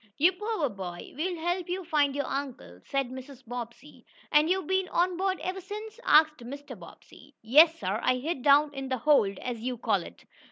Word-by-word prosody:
"You 335 +6 +5
poor 420 -4 -2
boy. 185 -6 -8
We'll 350 +5 -2
help 350 +2 -2
you 365 0 -3
find 295 -4 +1
your 285 - -1
uncle," 260 - -5
said 275 -2 -2
Mrs. 260 0 -10
Bobbsey. 245 +4 -8 0.3
"And 300 +2 +4
you've 375 -1 +1
been 380 +2 0
on 355 +1 +1
board 380 +1 -1
ever 375 +1 -4
since?" 425 +4 -8
asked 310 -1 +5
Mr. 270 +2 -9
Bobbsey. 255 +9 -16
"Yes, 310 +8 +6
sir. 195 +3 -2
I 255 - +2
hid 270 +2 -3
down 290 +2 +4
in 270 -1 -5
the 260 - 0
'hold,' 225 -7 +3
as 245 -2 -5
you 250 +1 -3
call 215 -5 +1
it. 85 - -13
285 Hz, 195 wpm, -28 LUFS, 245-350 Hz, 0.3 s, Yes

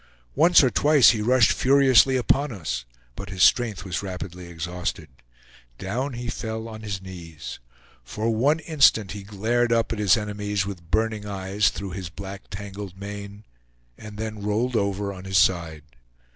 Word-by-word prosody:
Once 165 +2 +6
or 130 - +3
twice 145 -3 +5
he 110 -2 -2
rushed 120 +1 +4
furiously 135 -1 +4
upon 135 +3 +1
us, 80 - -4 0.3
but 100 - -8
his 95 -2 0
strength 110 -6 +3
was 90 -2 -3
rapidly 90 -2 -7
exhausted. 85 +1 -5 0.7
Down 125 - -3
he 120 0 -6
fell 110 -1 -4
on 110 -1 -9
his 100 -3 -5
knees. 85 -5 -9 0.4
For 105 - -2
one 135 +8 +2
instant 140 - +3
he 105 - -6
glared 110 +4 0
up 115 0 +1
at 110 - -5
his 105 +1 +4
enemies 105 -1 -2
with 90 -5 -8
burning 110 0 0
eyes 100 +1 0
through 100 -2 -6
his 90 -2 -6
black 95 +2 -9
tangled 100 -1 -8
mane, 100 +1 -8 0.5
and 105 - -11
then 110 -1 -5
rolled 110 +5 -1
over 100 -1 -1
on 95 0 -10
his 95 0 0
side. 85 -5 +1
105 Hz, 160 wpm, -24 LUFS, 95-115 Hz, 0.7 s, Once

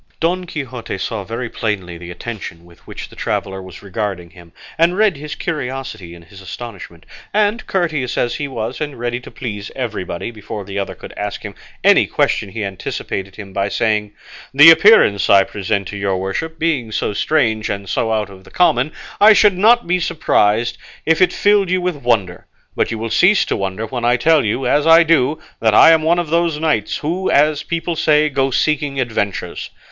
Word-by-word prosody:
Don 180 +2 0
Quixote 130 - -6
saw 105 +1 -4
very 115 +5 -5
plainly 100 -6 -3
the 85 +1 -10
attention 90 -3 -8
with 85 -1 -19
which - - -8
the - - -16
traveller 95 0 -3
was 95 0 -12
regarding 95 -3 -4
him, 85 -1 -16 0.2
and 170 +3 +2
read 210 -4 +3
his 150 +1 -7
curiosity 130 - -5
in 85 - -14
his 95 +3 -15
astonishment; 95 -5 -9 0.3
and 215 +3 +1
courteous 155 -9 -1
as 120 - 0
he 145 - -3
was 135 - -5
and 145 -2 -4
ready 120 +1 -3
to 125 - -12
please 105 -5 -6
everybody, 110 -5 -4
before 105 -2 -8
the 100 +1 -4
other 100 - -4
could - - -11
ask 105 0 -5
him 105 -2 -7 0.3
any - - +5
question 100 - 0
he 105 +3 -5
anticipated 95 0 -5
him 100 -3 -10
by 100 +1 -1
saying, 105 -2 -1 0.4
"The 150 +4 +9
appearance 165 - +5
I 100 -1 +7
present 100 -1 -3
to 105 - -6
your 100 -1 -1
worship 95 +13 -4
being 145 -9 -1
so 105 - -2
strange 110 -5 0
and 100 -1 -4
so 110 +4 -1
out 105 -2 -1
of 95 -1 -14
the - - -16
common, 155 -5 +2 0.3
I 215 +1 +8
should 210 -2 +4
not 230 +6 +4
be 180 +1 +1
surprised 115 -9 +1 0.3
if 165 +2 +2
it 185 - +4
filled 205 -2 +2
you 185 0 +1
with 180 -3 -2
wonder; 110 -9 -1 0.3
but - - 0
you 115 - -3
will 115 0 -4
cease 195 +3 +4
to - - -1
wonder 95 +3 -3
when 120 +2 -5
I 120 +1 +3
tell 155 +4 +3
you, 115 +5 -1
as 145 +5 +2
I 165 +1 +7
do, 155 -3 +2 0.2
that 110 -2 +2
I 165 - +8
am 160 -1 +4
one 165 +2 +2
of 170 -3 -2
those 170 -2 +1
knights 155 -10 0
who, 175 +5 -2
as 150 +1 +3
people 170 +1 -3
say, 155 -1 +3
go 135 -1 0
seeking 140 +1 0
adventures. 110 -5 -3
120 Hz, 195 wpm, -18 LUFS, 100-160 Hz, 0.4 s, The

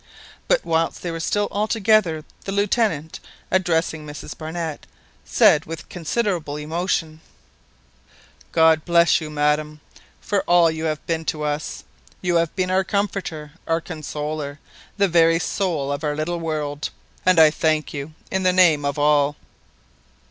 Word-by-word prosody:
But - - +2
whilst 165 0 0
they 175 - -2
were 165 - -5
still 205 +5 0
altogether, 210 -6 +2 0.2
the 195 - -3
Lieutenant, 200 -6 0 0.3
addressing 165 -4 +1
Mrs 150 0 -8
Barnett, 160 -1 -5 0.4
said 150 - +4
with 165 0 -8
considerable 175 -4 -2
emotion— 160 0 -2 1.3
"God 160 -1 +4
bless 170 -1 +4
you, 155 - -5
madam, 150 0 0 0.4
for 200 -2 0
all 175 -2 +5
you 160 0 -4
have 155 -1 -2
been 165 -1 -1
to 150 -1 -2
us. 150 0 -3 0.4
You 175 -1 +1
have 165 -1 0
been 185 -1 0
our 190 +1 +3
comforter, 190 -7 -3 0.2
our 165 0 +2
consoler, 150 -3 -5 0.4
the 200 -1 +3
very 165 -1 +4
soul 165 -6 -1
of 140 +2 -3
our 150 -1 -1
little 165 +3 -2
world; 150 -3 -3 0.3
and 185 -2 +4
I 155 -1 +8
thank 155 0 0
you 145 +1 -6 0.2
in 190 - 0
the 185 -1 +3
name 175 -5 +4
of 140 0 -1
all." 145 0 +3
160 Hz, 145 wpm, -22 LUFS, 150-180 Hz, 1.3 s, I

